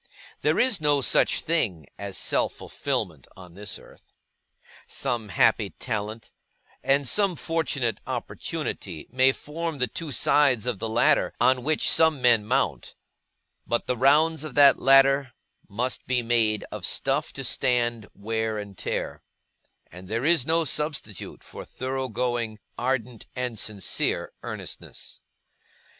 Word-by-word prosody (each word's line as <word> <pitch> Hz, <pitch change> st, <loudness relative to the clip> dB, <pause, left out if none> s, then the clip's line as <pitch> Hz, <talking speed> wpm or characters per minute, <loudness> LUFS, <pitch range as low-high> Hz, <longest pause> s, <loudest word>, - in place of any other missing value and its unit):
There -, -, +2 dB
is 245 Hz, -9 st, +3 dB
no 145 Hz, -2 st, +3 dB
such -, -, +3 dB
thing 100 Hz, -, -1 dB
as 100 Hz, -2 st, -4 dB
such -, -, +1 dB
fulfilment -, -, -4 dB
on 90 Hz, -2 st, -13 dB
this 100 Hz, +1 st, -4 dB
earth. -, -, -19 dB, 0.7 s
Some 115 Hz, -4 st, -2 dB
happy 110 Hz, +1 st, +3 dB
talent, 110 Hz, -1 st, -5 dB, 0.5 s
and 140 Hz, 0 st, +2 dB
some 200 Hz, -, +2 dB
fortunate 150 Hz, -8 st, -1 dB
opportunity, 80 Hz, -, -5 dB
may 130 Hz, +2 st, +4 dB
form 160 Hz, +3 st, -5 dB
the 125 Hz, -, +2 dB
two 155 Hz, +4 st, -7 dB
sides 130 Hz, -3 st, +3 dB
of 120 Hz, -6 st, -2 dB
the 115 Hz, -, -3 dB
ladder 115 Hz, +2 st, +2 dB
on 130 Hz, 0 st, +3 dB
which 155 Hz, +3 st, +1 dB
some 160 Hz, -3 st, +4 dB
men 120 Hz, -4 st, +3 dB
mount, -, -, -1 dB, 0.7 s
but 120 Hz, -, 0 dB
the 125 Hz, -, 0 dB
rounds 150 Hz, +5 st, +4 dB
of 150 Hz, -5 st, -7 dB
that 140 Hz, -1 st, +7 dB
ladder 135 Hz, -1 st, +5 dB, 0.4 s
must 120 Hz, +5 st, -3 dB
be 125 Hz, -2 st, +1 dB
made 115 Hz, -2 st, +1 dB
of -, -, -7 dB
stuff -, -, 0 dB
to -, -, -6 dB
stand 120 Hz, -3 st, +1 dB
wear 110 Hz, +1 st, -2 dB
and 100 Hz, -2 st, -8 dB
tear; -, -, -3 dB, 0.7 s
and 90 Hz, +2 st, -11 dB
there 115 Hz, +6 st, -2 dB
is 160 Hz, -5 st, +4 dB
no 165 Hz, +1 st, +3 dB
substitute 150 Hz, -, -2 dB
for -, -, -9 dB
thorough 130 Hz, 0 st, -4 dB
going, 120 Hz, -1 st, -2 dB, 0.2 s
ardent, 125 Hz, -2 st, -3 dB
and 125 Hz, -3 st, -3 dB
sincere 100 Hz, -4 st, -1 dB
earnestness. -, -, -8 dB
125 Hz, 135 wpm, -25 LUFS, 110-145 Hz, 0.7 s, that